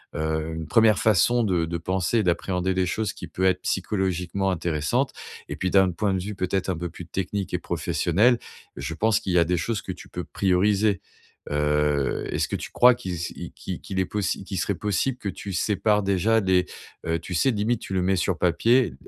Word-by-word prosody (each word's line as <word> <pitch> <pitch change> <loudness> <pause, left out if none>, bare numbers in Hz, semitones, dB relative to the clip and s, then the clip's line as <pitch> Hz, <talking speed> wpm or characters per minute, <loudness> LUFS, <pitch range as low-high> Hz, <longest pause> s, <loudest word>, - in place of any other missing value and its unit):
heu, 80 +1 -2
une 80 -1 -5
1ere 110 +1 +5
façon 115 +3 +3
de 90 -6 +1
de 85 +1 -3
penser 95 +5 0
et - - +2
d'appréhender 90 +1 0
des 95 0 +1
choses 110 +2 -2
qui - - -8
peut 95 - -4
être, 95 -1 +2
psychologiquement, 95 -1 -1
intéressantes. 80 -4 0 0.4
Et - - -3
puis 95 - -2
d'un 95 -2 +5
point 100 +3 0
de 95 - -1
vue, 105 +1 -5
peut-être, 95 0 -1
un 90 - -1
peu 85 +1 -4
plus 90 - -10
technique 95 +2 -3
et - - -1
professionnel, 110 +8 +2 0.4
je 70 +3 -4
pense 110 +3 +2
qu'il 95 -5 -3
y 90 - +5
a - - +6
des 90 +1 +1
choses 100 +4 -2
que - - -4
tu - - -10
peux - - -5
prioriser. 100 +2 +2 0.5
Heu, 75 -1 +1
est-ce - - 0
que - - -3
tu - - -7
crois 125 +1 +6
qui 120 -6 -6
s 85 0 -4
i - - -7
qui - - -6
qu'il 95 - -4
est 95 - +2
possi 100 0 -2
qu'il 95 -2 -4
serait 100 - 0
possible 105 +7 -1
que 105 - -4
tu 100 +1 -6
sépares 105 +3 +1
déjà 100 +4 +2
les, 95 -2 +3 0.4
heu, 80 0 +1
tu 85 +2 -7
sais, 90 +10 +3
limite 110 +1 0
tu - - -6
le 95 - +1
mets 95 +1 +2
sur 90 -1 0
papier, 115 +9 +3
95 Hz, 215 wpm, -25 LUFS, 85-105 Hz, 0.5 s, a